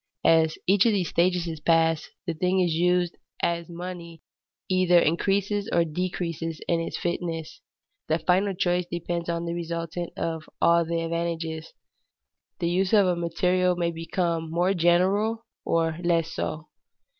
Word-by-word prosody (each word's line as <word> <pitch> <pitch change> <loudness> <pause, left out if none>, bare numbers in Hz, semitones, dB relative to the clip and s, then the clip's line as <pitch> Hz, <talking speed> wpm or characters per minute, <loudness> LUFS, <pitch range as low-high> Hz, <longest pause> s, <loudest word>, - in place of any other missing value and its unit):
As 160 -1 +4
each 200 +4 +4
of 225 - +3
these 180 -6 0
stages 175 0 +2
is 165 -2 -5
passed, 165 0 +2 0.2
the 170 - -1
thing 180 +4 0
used 175 0 +1 0.2
as 170 -1 0
money 170 -1 -8 0.4
either 185 -1 +4
increases 200 +5 +1
or 170 - +3
decreases 165 -1 -3
in 170 -1 +2
its 165 - -3
fitness. 165 -2 -4 0.5
The 160 - +2
final 185 +4 +1
choice 175 0 0
depends 170 0 -3
on 170 0 -2
the 170 - -2
resultant 170 0 -4
of 160 -1 -3
all 170 0 +4
the 165 0 -1
advantages. 165 -1 -3 0.8
The 170 - -1
use 185 +3 +1
of 205 -2 +6
a 180 -1 +2
material 180 +2 +1
may 170 -1 0
become 165 0 -2
more 175 +4 +1
general 195 +6 +2 0.2
or 165 -1 +1
less 165 -2 +1
so. 155 0 -4
170 Hz, 145 wpm, -26 LUFS, 165-180 Hz, 0.8 s, of